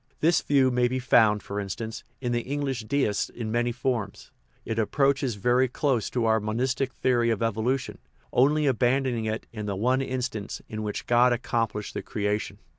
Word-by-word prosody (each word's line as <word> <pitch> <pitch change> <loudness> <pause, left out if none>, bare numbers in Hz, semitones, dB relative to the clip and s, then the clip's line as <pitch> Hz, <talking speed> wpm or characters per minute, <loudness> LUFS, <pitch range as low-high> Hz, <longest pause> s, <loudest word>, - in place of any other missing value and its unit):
This 165 +1 +3
view 135 -3 +3
may 125 0 +2
be 130 +1 -2
found, 110 -5 +4
for 100 +1 -4
instance, 110 +3 -5 0.2
in 120 -2 -1
the 120 0 +1
English 135 -3 -3
Deists 110 -5 0
in 110 -2 -5
many 120 +1 +1
forms. 120 -4 -3 0.3
It 115 0 -2
approaches 135 +1 +1
very 125 +6 +2
close 125 -3 0
to 120 -2 -1
our 110 0 +3
monistic 125 +5 -1
theory 120 -2 +1
of 115 0 0
evolution, 115 +4 -1 0.3
only 150 +4 +3
abandoning 125 -2 +1
it 110 +1 -3
in 105 -2 -5
the 100 - -2
one 125 +6 +1
instant 125 -5 -3
in 110 0 -5
which 105 -1 -4
God 120 +1 +4
accomplished 115 -3 -2
the - - -3
creation. 105 0 -2
120 Hz, 175 wpm, -26 LUFS, 110-130 Hz, 0.3 s, found